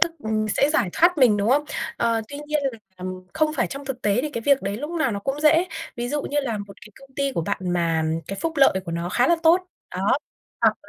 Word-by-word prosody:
tức, 335 - +4
ừm, 215 0 0
sẽ 280 +7 +2
giải 305 - +2
thoát 345 -1 +3
mình, 235 -6 +5
đúng 205 +2 0
không? 290 +3 +3 0.3
Ờ, 230 -1 +1
tuy 285 - -7
nhiên 300 -1 0
là, 230 - -11 0.2
ừm, 185 0 -7
không 310 -1 +2
phải 240 - +2
trong 275 +1 -7
thực 270 -2 -5
tế 205 +1 +2
thì 305 - -3
cái 230 - -4
việc 275 +3 +3
đấy 195 +1 -2
lúc 295 +7 -5
nào 320 -6 0
nó 200 - -2
cũng 270 +6 -3
dễ. 320 +3 +5 0.3
Ví 240 0 -3
dụ 290 +2 -1
như 290 - -4
là 235 -6 -3
một 200 -1 -8
cái 210 - -12
công 270 -1 -18
ty 275 -1 0
của 170 - -1
bạn 200 +5 -2
mà 165 -2 +1 0.2
cái 195 - -5
phúc 330 - -1
lợi 275 -1 +6
của 170 - -5
nó 170 +1 -2
khá 245 +7 +2
là 340 - +4
tốt, 335 +3 +6 0.4
đó, 195 +8 +2 0.4
hoặc - - +4
255 Hz, 265 wpm, -23 LUFS, 200-295 Hz, 0.4 s, lợi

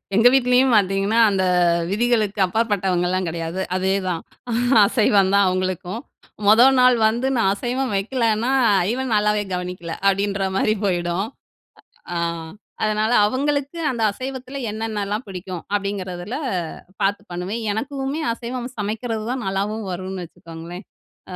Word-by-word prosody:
எங்க 225 +3 +6
வீட்லேயும் 250 0 +4
பார்த்தீங்கன்னா, 195 +2 +2
அந்த 195 -2 0 0.5
விதிகளுக்கு 215 -1 +1
அப்பாற்பட்டவங்கலாம் 185 -3 0
கெடையாது. 165 +2 -3
அதேதான் 185 -2 0 0.6
அசைவம் 200 -3 +3
தான் 200 -1 +5
அவங்களுக்கும். 185 +2 -2 0.5
மொத 220 +3 +7 0.2
நாள் 250 -1 +6
வந்து 235 +4 -1
நான் 210 -4 +3
அசைவம் 250 +3 -2
வைக்கலன்னா 230 +2 0 0.4
"இவன் 260 -2 -2
நல்லாவே 210 0 +2
கவனிக்கல" 180 -2 -5 0.2
அப்டின்ற 200 0 0
மாதிரி 215 +2 +2
போயிடும். 175 +1 0 0.9
அ - - -4 0.7
அதனால 215 +1 +1
அவுங்களுக்கு 285 +6 -1
அந்த 235 -3 -4
அசைவத்தில 260 +3 -6
என்னென்னலாம் 215 0 -3
பிடிக்கும் 185 -2 -6
அப்படிங்கிறதில 200 +1 -3 0.6
பார்த்து 200 +1 +1
பண்ணுவேன். 185 +6 -4
எனக்குமே 275 +5 -3
அசைவம் 245 +1 -5
சமைக்கிறது 220 +2 -3
தான் 255 -1 -3
நல்லாவும் 200 +2 -2
வரும்னு 185 0 -5
வச்சுக்கோங்களேன் 165 +3 -10 0.5
அ - - -8
205 Hz, 115 wpm, -21 LUFS, 185-235 Hz, 0.9 s, மொத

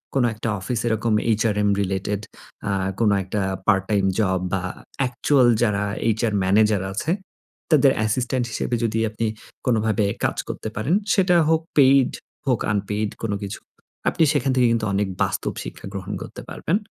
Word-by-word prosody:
কোনো 130 -3 +3
একটা 110 +1 -4
অফিস 110 +5 -2
এরকম 110 0 +1 0.2
এইচআরএম 105 -2 +2
রিলেটেড 95 +1 -2 0.5
আ - - +1 0.3
কোনো 105 -3 +4
একটা 100 +2 -2 0.3
পার্ট-টাইম 95 0 +2
জব 95 -3 +2
বা 95 - 0 0.4
অ্যাকচুয়াল 130 0 +3 0.2
যারা 105 -3 +1 0.2
এইচআর 110 0 +1
ম্যানেজার 105 0 +3
আছে 150 +11 -1 0.6
তাদের 140 -3 +6
অ্যাসিস্ট্যান্ট 120 +3 0
হিসেবে 120 - -1
যদি 110 0 0
আপনি 110 +1 -3 0.4
কোনোভাবে 110 -3 +2 0.2
কাজ - - 0
করতে 110 - -4
পারেন। 135 - +1 0.2
সেটা 180 -2 +3
হোক 160 0 +3 0.2
পেইড 135 -2 +6 0.4
হোক 125 -4 +2
আনপেইড 105 +1 -1
কোনো 105 -3 0
কিছু 100 +1 -5
না। - - -77 0.4
আপনি 165 - +1
সেখান 135 -2 +1
থেকে 125 -2 +4
কিন্তু 115 -2 +1
অনেক 100 0 +1 0.2
বাস্তব - - -2
শিক্ষা - - -9
গ্রহণ 100 +1 -5
করতে - - -8
পারবেন। 175 - 0
110 Hz, 155 wpm, -23 LUFS, 105-125 Hz, 0.6 s, তাদের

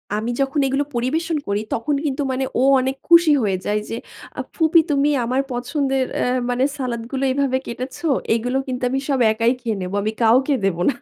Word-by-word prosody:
আমি 220 +3 -2
যখন 275 +2 0
এগুলো 275 +2 0
পরিবেশন 315 +7 -1
করি, 200 +1 0
তখন 285 +5 -1
কিন্তু 280 -1 -1
মানে 265 +1 -1 0.2
ও - - +3 0.2
অনেক 265 +1 -1
খুশি 335 -2 +7
হয়ে 195 -3 0
যায়। 210 +1 +1
যে 225 - -3 0.4
আ - - +1
ফুপি 325 0 +4
তুমি 285 +1 +2 0.2
আমার 255 +3 +1
পছন্দের 265 +2 -1
অ্যা - - 0 0.2
মানে 245 +1 +1
সালাদগুলো 250 0 -3
এভাবে 270 -1 +1
কেটেছো। 255 +7 -6 0.3
এগুলো 245 +3 -1
কিন্তু 250 -1 -4
আমি 265 +2 0
সব 270 - +1
একাই 230 +2 +2
খেয়ে 225 -4 -2
নেব। 180 +1 -5
আমি 215 - -1
কাউকে 260 +6 +4
দেব 185 -4 0
না। - - +1
260 Hz, 190 wpm, -21 LUFS, 235-280 Hz, 0.4 s, খুশি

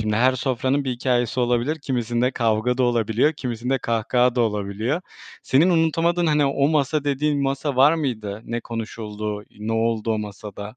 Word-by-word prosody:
Şimdi 105 -1 0
her 130 +3 +4
sofranın 130 +2 0
bir 130 - -1
hikâyesi 120 0 0
olabilir, 125 +5 +1
kimisinde 120 -1 0
kavga 115 +1 0
da 130 - +3
olabiliyor, 120 +4 +2
kimisinde 125 -1 -2
kahkaha 120 +2 +1
da 125 - +1
olabiliyor. 110 - -1 0.4
Senin 160 +8 +3
unutamadığın, 170 +1 +2
hani, 150 -2 +3
"o 140 +1 +2
masa" 150 -1 +1
dediğin 145 0 0
masa 140 0 -1
var 145 +5 +6
mıydı, 110 -8 -3
ne 120 +1 -3
konuşuldu, 105 -2 -5 0.2
ne 110 +1 -2
oldu 115 0 0
o 110 - -1
masada? 105 +1 -8
125 Hz, 160 wpm, -23 LUFS, 110-140 Hz, 0.4 s, var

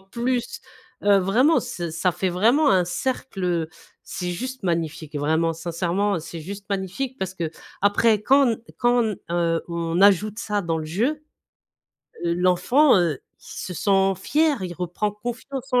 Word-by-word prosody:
plus, 235 +5 -3 0.4
heu, 200 -1 +6
vraiment 240 - +3
ç 175 -9 -5
ça 170 +2 +1
fait 190 - -1
vraiment 235 - +3
un 180 -2 +4
cercle, 195 +1 -3
heu, 170 -3 0 0.3
c'est 180 -2 -5
juste 255 +6 -5
magnifique. 160 -3 -2
Vraiment 160 +3 +1
sincèrement, 175 +4 -1
c'est 165 +1 -8
juste 195 +4 -8
magnifique 200 +8 -3
parce 190 0 -4
qu'après 200 +6 0
quand 270 +2 +5
n 225 - -2 0.2
quand 240 -1 +3
n, 215 -3 -1
heu, 170 -1 +1
on 170 0 -2
ajoute 205 +2 +4
ça 210 -2 -1
dans 165 -3 -1
le 155 - -4
jeu, 250 - -1 1.0
l' 170 0 +1
l'enfant, 185 +11 +4
heu, 165 -6 +1 0.2
il - - -31
se 180 - -7
sent 195 0 +2
fier, 300 -7 +2
il 175 -1 -4
reprend 180 +4 -2
confiance 255 +4 -6
en 250 - +4
195 Hz, 160 wpm, -23 LUFS, 170-240 Hz, 1.0 s, heu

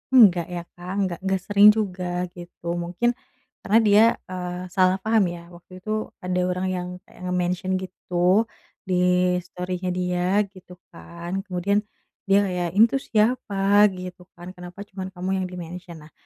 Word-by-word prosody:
enggak 185 -9 +7
ya 175 -1 -5
Kak, 180 +2 -7
enggak 185 -3 -1
enggak 190 -1 0
sering 205 0 +6
juga 180 -4 -2
gitu 175 -1 -11
mungkin 180 +8 0 0.5
karena 215 +3 +4
dia, 210 0 +6 0.3
eee, 180 0 -4
salah 185 0 +3
paham 220 -1 +3
ya, 170 0 -10
waktu 175 +1 -13
itu 215 +1 -2 0.2
ada 180 0 -1
orang 185 +1 -1
yang 180 -1 -3 0.2
kayak - - -19
nge-mention 180 +1 -1
gitu 185 +3 +1 0.4
di 180 0 +3
story-nya 180 +1 -4
dia 180 +2 0
gitu 180 -1 -14
kan, 170 +3 -6
kemudian 200 +2 0 0.5
dia 200 +1 +5
ya, 180 -1 -2
"Ini 205 +5 +6
tuh 275 - 0
siapa?" 210 -3 +3
Gitu 180 0 -8
kan, 175 +1 -9
"Kenapa 180 +2 -10
cuman 190 -1 -6
kamu 180 +1 -4
yang - - -2
di-mention?" 175 -1 -8
Nah - - -23
180 Hz, 155 wpm, -24 LUFS, 180-195 Hz, 0.5 s, enggak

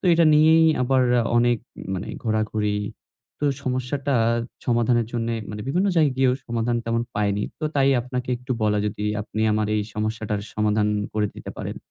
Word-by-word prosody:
তো - - -10
এটা 165 0 +5
নিয়েই 160 +2 +6 0.2
আবার 130 +1 +3 0.3
অনেক 120 -1 +3 0.4
মানে 90 - -4
ঘোরাঘুরি। 110 -2 0 0.7
তো - - +3 0.2
সমস্যাটা 130 +2 -1 0.5
সমাধানের 120 -1 +2
জন্যে 115 -1 -1 0.2
মানে 105 0 -6
বিভিন্ন 180 +8 +1
জায়গায় 150 -5 +3
গিয়েও 130 -1 +3
সমাধান 120 0 0
তেমন 115 0 0
পাইনি। 105 0 0 0.2
তো - - -2
তাই 135 -1 +3
আপনাকে 125 +1 -4
একটু 125 +1 -4
বলা 105 -1 +2
যদি 105 0 -4 0.2
আপনি 110 0 -5
আমার 105 0 +1
এই 105 - +1
সমস্যাটার 110 -1 -2
সমাধান 105 0 +1 0.3
করে 105 -1 +1
দিতে - - -8
পারেন। - - -5
115 Hz, 160 wpm, -23 LUFS, 105-130 Hz, 0.7 s, নিয়েই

